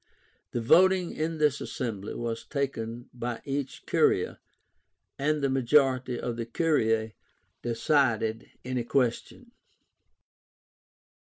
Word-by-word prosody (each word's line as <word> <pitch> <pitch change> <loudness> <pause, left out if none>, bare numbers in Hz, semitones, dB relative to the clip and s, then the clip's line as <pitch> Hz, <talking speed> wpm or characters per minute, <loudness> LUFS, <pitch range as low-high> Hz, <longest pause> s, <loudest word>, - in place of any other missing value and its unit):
The 120 - -2
voting 185 +8 +4
in 160 +1 -2
this 150 -2 +2
assembly 110 -6 -4
was 115 -1 -3
taken 120 -4 -3
by 120 -1 -4
each 140 -1 -4
curia, - - +2 0.8
and 150 +1 +1
the - - +4
majority 130 -1 +2
of 120 -1 -3
the 115 - -3
curiae 115 -8 +1 0.5
decided 115 -3 +1 0.2
any 125 -1 -1
question. 130 - -1
130 Hz, 100 wpm, -28 LUFS, 115-145 Hz, 0.8 s, voting